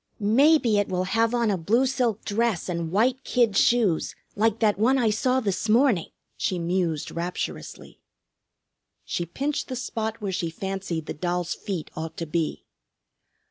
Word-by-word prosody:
"Maybe 235 Hz, +1 st, +4 dB
it 205 Hz, -, 0 dB
will 185 Hz, 0 st, 0 dB
have 225 Hz, +4 st, +1 dB
on 235 Hz, -3 st, +2 dB
a 190 Hz, -, -1 dB
blue 230 Hz, +10 st, +2 dB
silk 250 Hz, -5 st, -1 dB
dress 220 Hz, -3 st, 0 dB
and 170 Hz, -2 st, -3 dB
white 245 Hz, +7 st, +2 dB
kid 235 Hz, -5 st, +2 dB
shoes, 210 Hz, -8 st, +2 dB, 0.2 s
like 220 Hz, +1 st, +2 dB
that 210 Hz, -4 st, +2 dB
one 255 Hz, +5 st, +4 dB
I 230 Hz, -4 st, +2 dB
saw 255 Hz, +4 st, +1 dB
this 210 Hz, -2 st, -2 dB
morning!" 230 Hz, -, +3 dB, 0.3 s
she 185 Hz, -, -1 dB
mused 170 Hz, -3 st, -1 dB
rapturously. 175 Hz, +2 st, -5 dB, 1.1 s
She 175 Hz, -, -3 dB
pinched 280 Hz, -, -2 dB
the 255 Hz, -, -4 dB
spot 225 Hz, -2 st, -3 dB
where 205 Hz, -3 st, -3 dB
she 170 Hz, -2 st, -2 dB
fancied 190 Hz, -2 st, -4 dB
the -, -, -4 dB
doll's 175 Hz, +1 st, -2 dB
feet 180 Hz, -6 st, -5 dB
ought 160 Hz, 0 st, -6 dB
to 165 Hz, -, -3 dB
be. 160 Hz, 0 st, -2 dB
205 Hz, 160 wpm, -25 LUFS, 175-235 Hz, 1.1 s, Maybe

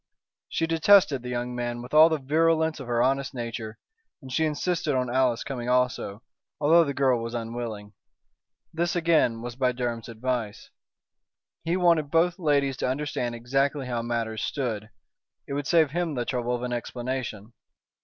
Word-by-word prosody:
She 165 Hz, -, 0 dB
detested 165 Hz, -3 st, +4 dB
the 125 Hz, -, -7 dB
young 125 Hz, 0 st, -3 dB
man 120 Hz, 0 st, -3 dB
with 125 Hz, -, -11 dB
all 155 Hz, +2 st, +8 dB
the 160 Hz, -, +1 dB
virulence 160 Hz, +2 st, +1 dB
of 135 Hz, -, -8 dB
her 120 Hz, 0 st, +2 dB
honest 135 Hz, +1 st, 0 dB
nature. 115 Hz, -2 st, -5 dB, 0.4 s
And 130 Hz, -3 st, -10 dB
she 160 Hz, -, +2 dB
insisted 155 Hz, 0 st, -1 dB
on 125 Hz, -1 st, -1 dB
Alice 130 Hz, -3 st, +2 dB
coming 125 Hz, -3 st, -4 dB
also, 125 Hz, -4 st, 0 dB, 0.4 s
although 165 Hz, +3 st, +5 dB
the 140 Hz, -3 st, -3 dB
girl 130 Hz, -4 st, +2 dB
was 115 Hz, +1 st, -5 dB
unwilling. 115 Hz, -3 st, -5 dB, 0.8 s
This 170 Hz, +2 st, -1 dB
again 160 Hz, -9 st, +2 dB
was 120 Hz, -1 st, -6 dB
by 125 Hz, -1 st, +1 dB
Durham's 120 Hz, -2 st, -3 dB
advice. 115 Hz, -2 st, -4 dB, 0.9 s
He 170 Hz, +2 st, +1 dB
wanted 170 Hz, -5 st, +3 dB
both 170 Hz, +3 st, +2 dB
ladies 140 Hz, -5 st, +1 dB
to -, -, -1 dB
understand 130 Hz, -3 st, -2 dB
exactly 135 Hz, +4 st, 0 dB
how 120 Hz, -2 st, -2 dB
matters 115 Hz, -2 st, -2 dB
stood. 110 Hz, -6 st, -3 dB, 0.6 s
It -, -, -5 dB
would 140 Hz, -1 st, -2 dB
save 160 Hz, -5 st, +4 dB
him 170 Hz, -2 st, -1 dB
the 120 Hz, -1 st, -2 dB
trouble 125 Hz, -1 st, -1 dB
of 120 Hz, -, -5 dB
an 125 Hz, 0 st, -2 dB
explanation. 120 Hz, -3 st, -4 dB
130 Hz, 165 wpm, -26 LUFS, 120-150 Hz, 0.9 s, all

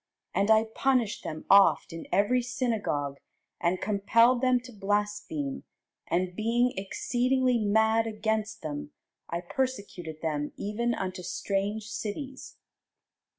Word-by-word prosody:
And 200 Hz, +2 st, +1 dB
I 220 Hz, 0 st, +6 dB
punished 235 Hz, 0 st, 0 dB
them 155 Hz, 0 st, -6 dB
oft 195 Hz, -3 st, +5 dB
in 165 Hz, -, -7 dB
every 240 Hz, +5 st, +3 dB
synagogue, 220 Hz, -, -2 dB, 0.4 s
and 175 Hz, +1 st, +1 dB
compelled 230 Hz, +5 st, +3 dB
them 255 Hz, -1 st, +4 dB
to 250 Hz, 0 st, -11 dB
blaspheme; 205 Hz, -8 st, -2 dB, 0.4 s
and 180 Hz, +1 st, 0 dB
being 235 Hz, +4 st, +2 dB
exceedingly 250 Hz, +5 st, +1 dB
mad 220 Hz, +2 st, +3 dB
against 220 Hz, 0 st, -2 dB
them, 295 Hz, 0 st, -5 dB, 0.4 s
I 170 Hz, +1 st, -2 dB
persecuted 180 Hz, -8 st, -4 dB
them 150 Hz, -2 st, -2 dB
even 235 Hz, +4 st, -1 dB
unto 185 Hz, 0 st, -4 dB
strange 195 Hz, +4 st, -2 dB
cities. 260 Hz, +6 st, -6 dB
210 Hz, 115 wpm, -28 LUFS, 185-240 Hz, 0.4 s, I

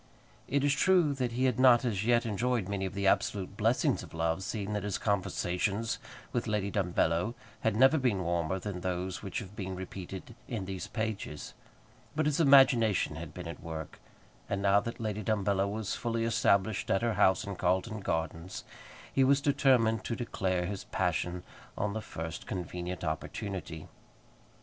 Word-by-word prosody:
It 140 Hz, 0 st, +1 dB
is 145 Hz, -1 st, +4 dB
true 170 Hz, 0 st, +4 dB
that 125 Hz, -3 st, -2 dB
he 130 Hz, +2 st, +1 dB
had 125 Hz, -2 st, +1 dB
not 125 Hz, -1 st, +6 dB
as 105 Hz, -5 st, 0 dB
yet 120 Hz, +1 st, +3 dB
enjoyed 115 Hz, -1 st, 0 dB
many 100 Hz, -1 st, -1 dB
of 95 Hz, -, -8 dB
the 100 Hz, 0 st, -1 dB
absolute 95 Hz, 0 st, +1 dB
blessings -, -, +2 dB
of -, -, -11 dB
love, 80 Hz, +2 st, 0 dB
seeing 105 Hz, 0 st, -3 dB
that 105 Hz, -, -1 dB
his 100 Hz, -1 st, -2 dB
conversations 100 Hz, +1 st, -1 dB, 0.3 s
with 120 Hz, -1 st, -1 dB
Lady 105 Hz, -2 st, 0 dB
Dumbello 90 Hz, +2 st, +1 dB, 0.2 s
had 110 Hz, -2 st, +1 dB
never 135 Hz, +6 st, +6 dB
been 115 Hz, -8 st, +1 dB
warmer 85 Hz, +1 st, 0 dB
than 95 Hz, -1 st, -5 dB
those 90 Hz, 0 st, -2 dB
which 100 Hz, -3 st, -5 dB
have 100 Hz, +1 st, -6 dB
been 95 Hz, -3 st, -4 dB
repeated 95 Hz, +3 st, -7 dB
in 110 Hz, -6 st, -3 dB
these 95 Hz, -1 st, -5 dB
pages; 110 Hz, -9 st, -4 dB, 0.6 s
but 155 Hz, 0 st, +1 dB
his 150 Hz, 0 st, +1 dB
imagination 125 Hz, -, +5 dB
had 80 Hz, -1 st, -7 dB
been 90 Hz, -2 st, -7 dB
at 85 Hz, -, -7 dB
work; 80 Hz, -1 st, -7 dB, 0.5 s
and 100 Hz, -, 0 dB
now 100 Hz, 0 st, +4 dB
that 115 Hz, +3 st, -6 dB
Lady 110 Hz, -2 st, -2 dB
Dumbello 100 Hz, -2 st, +1 dB
was 110 Hz, -2 st, -3 dB
fully 115 Hz, -1 st, -1 dB
established 110 Hz, -3 st, +2 dB
at 95 Hz, -, +2 dB
her 115 Hz, -1 st, +2 dB
house 95 Hz, -2 st, +4 dB
in 100 Hz, -1 st, -5 dB
Carlton 95 Hz, +5 st, 0 dB
Gardens, 85 Hz, -1 st, -3 dB, 0.5 s
he 135 Hz, -, +4 dB
was 135 Hz, +1 st, +5 dB
determined 130 Hz, -6 st, +3 dB
to 115 Hz, -, -1 dB
declare 95 Hz, -7 st, -1 dB
his 95 Hz, +1 st, -5 dB
passion 90 Hz, 0 st, -1 dB, 0.3 s
on 100 Hz, 0 st, -1 dB
the 110 Hz, -, -3 dB
first 80 Hz, -6 st, -6 dB
convenient 90 Hz, 0 st, -4 dB
opportunity. 80 Hz, 0 st, -4 dB
100 Hz, 170 wpm, -31 LUFS, 90-115 Hz, 0.6 s, not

